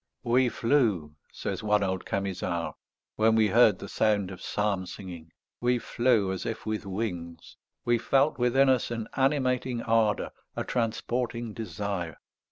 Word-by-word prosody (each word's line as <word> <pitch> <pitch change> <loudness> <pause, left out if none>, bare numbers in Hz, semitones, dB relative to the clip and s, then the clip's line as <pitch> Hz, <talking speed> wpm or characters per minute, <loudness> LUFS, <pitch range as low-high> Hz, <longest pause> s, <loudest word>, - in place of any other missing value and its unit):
"We 125 +1 +3
flew," 115 - +1 0.2
says - - -4
one 105 -1 +2
old 95 -1 -2
Camisard, 90 -3 -2 0.4
"when 110 +1 +4
we 110 -2 +4
heard 110 -2 +5
the 100 - -8
sound 100 -2 +1
of 95 - -9
psalm 100 -3 -1
singing, 85 -5 -9 0.3
we 125 +1 +2
flew 120 -5 +2
as 95 - -3
if 115 - -4
with 110 -2 -3
wings. 90 -5 -5 0.3
We 120 -1 +3
felt 135 +4 +2
within 130 +3 +4
us 130 -2 +2
an 115 -2 -4
animating 130 -3 +1
ardour, 110 -2 +2 0.2
a - - -2
transporting 120 0 -2
desire. 100 -7 -4
110 Hz, 145 wpm, -28 LUFS, 95-120 Hz, 0.4 s, heard